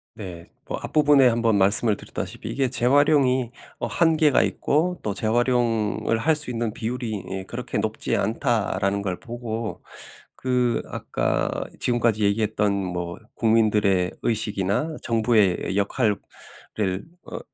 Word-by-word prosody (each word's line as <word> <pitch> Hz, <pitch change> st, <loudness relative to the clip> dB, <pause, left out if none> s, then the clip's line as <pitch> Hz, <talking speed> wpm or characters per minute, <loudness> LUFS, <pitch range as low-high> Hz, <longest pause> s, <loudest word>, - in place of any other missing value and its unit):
네. 90 Hz, -5 st, -8 dB, 0.2 s
뭐 -, -, -3 dB
앞부분에 145 Hz, -3 st, +4 dB
한번 115 Hz, -2 st, +1 dB
말씀을 100 Hz, +3 st, +4 dB
드렸다시피 110 Hz, -, -6 dB
이게 130 Hz, +2 st, 0 dB
재활용이 130 Hz, -1 st, +3 dB, 0.3 s
어 -, -, -2 dB
한계가 160 Hz, -4 st, +3 dB
있고 175 Hz, +5 st, 0 dB
또 105 Hz, -, -2 dB
"재활용을 115 Hz, -1 st, +1 dB
할 155 Hz, +7 st, +2 dB
수 150 Hz, -4 st, +3 dB
있는 115 Hz, -2 st, -2 dB
비율이 120 Hz, +1 st, -4 dB, 0.2 s
이 95 Hz, 0 st, -4 dB
그렇게 -, -, -4 dB
높지 -, -, -1 dB
않다."라는 105 Hz, -4 st, 0 dB
걸 95 Hz, -3 st, -2 dB
보고 115 Hz, -2 st, -5 dB, 0.5 s
그 125 Hz, -2 st, 0 dB
아까 -, -, -1 dB, 0.3 s
지금까지 115 Hz, -3 st, +1 dB
얘기했던 105 Hz, 0 st, +1 dB
뭐 90 Hz, -3 st, -3 dB, 0.2 s
국민들의 105 Hz, -5 st, +2 dB
의식이나 110 Hz, -, -1 dB
정부의 110 Hz, -5 st, +1 dB
역할을 105 Hz, +2 st, +1 dB, 1.1 s
어 -, -, -7 dB
115 Hz, 275 characters per minute, -24 LUFS, 100-125 Hz, 1.1 s, 앞부분에